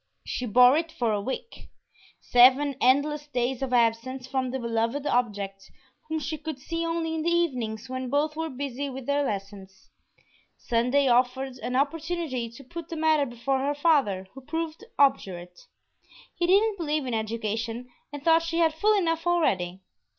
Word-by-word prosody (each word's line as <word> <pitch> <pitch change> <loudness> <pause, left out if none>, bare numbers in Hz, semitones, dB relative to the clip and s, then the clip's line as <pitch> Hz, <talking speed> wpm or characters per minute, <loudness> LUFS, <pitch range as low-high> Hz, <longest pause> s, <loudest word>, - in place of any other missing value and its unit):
She 250 - -3
bore 250 +4 +6
it 325 0 -2
for 235 -6 0
a 205 - -1
week 265 - -6 0.5
seven 265 +3 +5
endless 290 +3 +2
days 255 -1 -1
of 265 -2 -2
absence 245 +2 +1
from 260 -1 -2
the 260 - -2
beloved 235 +3 -1
object, 205 -7 -1 0.4
whom 315 - -1
she 305 +1 -4
could 310 -2 -5
see 330 +5 -4
only 330 -1 -1
in 320 - -2
the 335 - +1
evenings 250 -11 -1
when 255 0 -4
both 295 +3 0
were 320 0 -3
busy 280 0 -4
with 265 -1 -7
their 285 +1 +1
lessons. 195 -4 -6 0.7
Sunday 250 +4 +1
offered 255 +1 +1
an 250 - -3
opportunity 295 -3 -1
to 235 +4 -13
put 335 +5 -8
the 330 - -5
matter 310 -2 +3
before 245 +3 -1
her 285 +2 -1
father, 275 - +2
who 270 - -11
proved 320 +5 -4
obdurate. 185 -11 0 0.7
He 345 - -1
didn't 405 +3 +3
believe 305 -3 -1
in 250 - -3
education 225 +2 -3 0.2
and 290 -1 -8
thought 325 0 +5
she 330 0 -3
had 325 -2 +3
full 420 +7 +3
enough 330 -2 0
already. 190 - +1
270 Hz, 165 wpm, -26 LUFS, 235-315 Hz, 0.7 s, bore